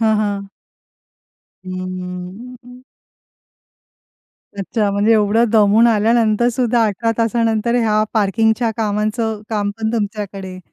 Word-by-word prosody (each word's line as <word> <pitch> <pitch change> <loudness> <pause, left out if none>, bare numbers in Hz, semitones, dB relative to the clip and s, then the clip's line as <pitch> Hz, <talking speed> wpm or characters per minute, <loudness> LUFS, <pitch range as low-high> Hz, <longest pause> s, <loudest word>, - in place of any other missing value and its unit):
हां, 220 -1 +3
हां. 200 -2 -2 1.2
हं, 185 - -5
हं, 180 -1 -6
हं, 250 +2 -10
हं. 250 0 -14 1.7
अच्छा, 205 +1 -1
म्हणजे 205 +3 +2
एवढं 215 +1 +3
दमून 215 +1 +5
आल्यानंतर 225 +1 +2
सुद्धा 240 -1 +1
18 220 +2 -1
तासानंतर, 230 0 +1
ह्या 215 -2 +2
पार्किंगच्या 220 +2 +1
कामाचं 215 +1 -1
काम 205 -2 -1
पण 220 0 -2
तुमच्याकडे. 200 -4 -4
215 Hz, 110 wpm, -18 LUFS, 205-230 Hz, 1.7 s, दमून